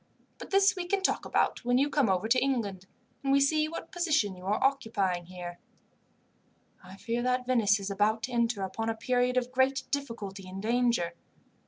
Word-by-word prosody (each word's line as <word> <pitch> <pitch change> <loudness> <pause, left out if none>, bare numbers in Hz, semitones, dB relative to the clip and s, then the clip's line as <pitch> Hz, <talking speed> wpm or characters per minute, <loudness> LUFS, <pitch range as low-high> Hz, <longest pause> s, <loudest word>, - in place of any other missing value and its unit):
But - - -9
this 390 0 +4
we 360 -2 -4
can 390 +1 0
talk - - +1
about - - 0
when 245 +1 +2
you 275 +2 +3
come 285 -6 +1
over 190 +3 +1
to 250 +3 +3
England, 205 -9 -2 0.4
and 275 - +1
we 275 - +5
see 305 +2 +2
what 330 +1 -7
position 315 - +1
you 180 +1 -10
are 210 - 0
occupying 200 -10 0
here. 175 -1 -8 1.2
"I 185 +1 -12
fear 235 +3 -2
that 250 0 0
Venice 220 -5 +3
is 200 0 -4
about 215 +3 +1
to 255 - -3
enter 235 -4 0
upon 225 +4 -3
a 225 - -1
period 250 +2 0
of 250 0 0
great 260 +1 +2
difficulty 210 -9 -4
and 190 +1 -7
danger. 235 -5 +1
235 Hz, 190 wpm, -29 LUFS, 200-270 Hz, 1.2 s, we